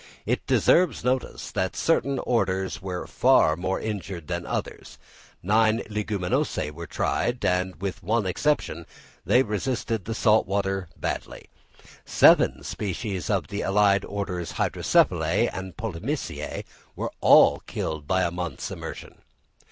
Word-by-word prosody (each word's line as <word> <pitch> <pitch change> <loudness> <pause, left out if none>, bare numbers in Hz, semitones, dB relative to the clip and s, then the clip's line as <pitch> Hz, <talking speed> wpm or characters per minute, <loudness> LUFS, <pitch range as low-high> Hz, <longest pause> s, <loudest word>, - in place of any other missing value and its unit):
It - - -1
deserves 180 -2 +3
notice 130 +1 -2
that 95 0 -2
certain 140 -4 +1
orders 95 -7 -1
were 90 -2 -4
far 80 - +4
more 95 +3 -2
injured 100 -6 -5
than - - -3
others: - - -5 0.5
nine 110 +3 +3
Leguminosæ 100 -7 -1
were 85 +2 -8
tried, 120 0 -1
and, 90 0 0
with 100 +2 -4
one 105 +3 0
exception, 90 - -1 0.4
they 125 +2 +4
resisted 115 -2 -2
the 115 - -3
salt 110 -2 +3
water 95 -1 -1
badly; - - -5 0.5
seven - - +4
species 95 -3 -4
of - - 0
the 100 - -3
allied 100 0 +3
orders, 90 -4 -4
Hydrophyllaceæ - - +2
and 95 -1 -7
Polemoniaceæ, 100 -7 -4 0.3
were - - -3
all - - +6
killed 75 -2 -4
by 95 +2 +2
a 85 - 0
month's 90 -1 -5
immersion. - - -8
95 Hz, 130 wpm, -25 LUFS, 90-110 Hz, 0.5 s, all